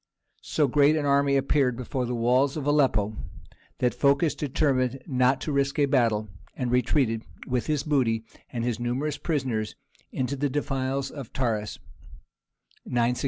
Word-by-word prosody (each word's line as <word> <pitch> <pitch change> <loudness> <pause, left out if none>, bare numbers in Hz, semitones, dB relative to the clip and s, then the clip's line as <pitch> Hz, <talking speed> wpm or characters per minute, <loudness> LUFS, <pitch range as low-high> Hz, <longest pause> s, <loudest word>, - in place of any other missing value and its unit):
So 150 -2 +1
great 145 +3 +4
an 150 -2 -1
army 140 0 +3
appeared 135 -2 +1
before 125 0 -3
the 125 - -2
walls 125 +5 +2
of 145 - -4
Aleppo 130 -8 +2 0.6
that 125 - +1
Phocas 140 +5 +2
determined 135 -3 0
not 130 -1 +2
to 155 - -3
risk 140 -1 0
a 145 - +4
battle, 115 -6 +2 0.3
and 125 -2 -2
retreated 125 -2 +2 0.2
with 125 -2 -1
his 150 -3 0
booty 120 -7 +1 0.3
and 120 -2 -3
his 120 -2 -1
numerous 130 +5 -2
prisoners 130 -9 -2 0.4
into 130 +2 -2
the 145 +1 -1
defiles 135 -1 -2
of 140 -6 -8
Taurus 110 -5 -1 1.1
[962 120 - -2
A.D.]. 120 +1 +1
130 Hz, 155 wpm, -26 LUFS, 120-140 Hz, 1.1 s, great